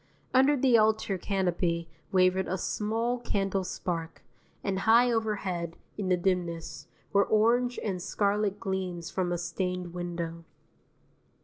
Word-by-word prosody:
Under 270 +3 +5
the 250 -3 +5
altar 215 -3 +2
canopy 175 -3 0 0.2
wavered 185 0 +3
a 190 - -1
small 225 +6 -1
candle 195 -4 -1
spark, 165 -2 -4 0.4
and 190 -1 -1
high 235 +4 +5
overhead, 195 -7 -2 0.2
in 200 -3 -3
the 180 - +4
dimness, 175 -2 -2 0.3
were 200 0 +5
orange 240 +3 +3
and 190 -4 -2
scarlet 205 +1 0
gleams 185 -3 -3
from 180 -2 -1
a 175 - 0
stained 180 0 -3
window. 170 -1 -4
190 Hz, 125 wpm, -29 LUFS, 175-215 Hz, 0.4 s, Under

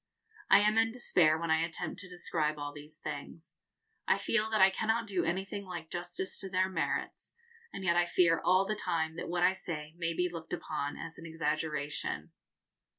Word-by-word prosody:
I - - +8
am 210 +1 +4
in 225 0 +3
despair 175 -10 +3
when 165 0 -2
I 160 - +4
attempt 170 0 -2
to 185 - -6
describe 160 -4 0
all 145 0 -5
these 150 +1 -8
things. 155 +2 -7 0.5
I - - +4
feel 220 -1 +1
that 220 -1 +1
I 190 0 +7
cannot 225 +3 0
do 195 -4 0
anything 195 +3 -2
like 175 -4 -7
justice 175 +2 -2
to 195 - -4
their 185 0 +2
merits, 190 - -2 0.4
and 195 - -6
yet 170 -2 +3
I 175 0 +3
fear 170 -2 +3
all 185 +2 +4
the 215 - 0
time 160 -5 -1
that - - -4
what 175 0 0
I 185 - +5
say 155 -5 -6
may 165 -1 -1
be 180 +1 +2
looked 165 -1 -7
upon 155 -4 -3
as 165 0 -7
an 165 - -8
exaggeration. 150 -2 -2
175 Hz, 195 wpm, -32 LUFS, 160-190 Hz, 0.5 s, I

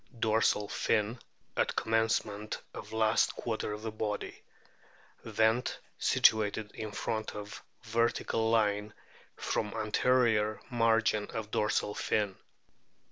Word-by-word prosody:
Dorsal 110 -2 +2
fin 110 +4 0 0.4
at - - 0
commencement 110 -2 0
of - - -8
last 110 -1 +2
quarter - - -3
of 110 +1 -6
body. 105 -1 -3 0.8
Vent 110 +2 +1 0.2
situated 105 -1 +3
in 110 -1 -5
front 110 +1 -3
of 105 0 -7 0.2
vertical 115 -1 +1
line 105 -2 +1 0.4
from 105 -1 -2
anterior 110 -1 +2
margin 115 -2 +2
of 110 -1 -5
dorsal 105 -1 +1
fin. 105 -2 0
110 Hz, 100 wpm, -31 LUFS, 105-115 Hz, 0.8 s, situated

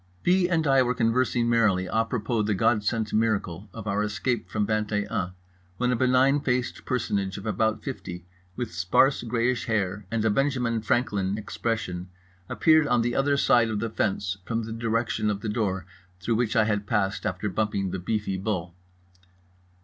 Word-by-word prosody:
B. 180 0 +3
and 165 -3 +1
I 135 -1 +5
were 125 0 +1
conversing 120 +1 +1
merrily 110 -6 +3
à 115 +3 0
propos 115 -2 -1
the 105 - +1
God 105 +3 +2
sent 110 0 -1
miracle 105 -4 0
of 115 -2 -8
our 100 0 0
escape 105 -1 -2
from 105 +2 0
Vingt 110 0 -1
et 105 -1 0
Un, 90 +1 -2 0.4
when 125 +4 +1
a - - +2
benign 130 +3 +3
faced 125 -3 -2
personage 100 -6 -1
of 100 - -8
about 110 +1 0
fifty 90 - -6 0.3
with 120 -7 -4
sparse 90 +10 +3
greyish 120 +1 0
hair 100 -3 -1
and 110 0 -1
a 110 - +3
Benjamin 125 -2 0
Franklin 105 -4 0
expression 100 -4 -3 0.4
appeared 155 -2 +4
on 120 -2 +2
the 120 +1 0
other 140 +1 +2
side 120 -4 +4
of 110 -2 -2
the 115 0 -3
fence, 100 -2 -1
from 115 +3 -2
the 110 0 -5
direction 115 -1 -1
of 100 -1 -2
the 110 - -3
door 100 -5 -1 0.3
through 105 +6 -1
which 115 +1 0
I 110 - +5
had 105 -2 -1
passed 95 +2 0
after 105 - -2
bumping 100 -1 -1
the 95 - -3
beefy 100 +1 -2
bull. 95 -4 -3
110 Hz, 180 wpm, -26 LUFS, 100-120 Hz, 0.4 s, I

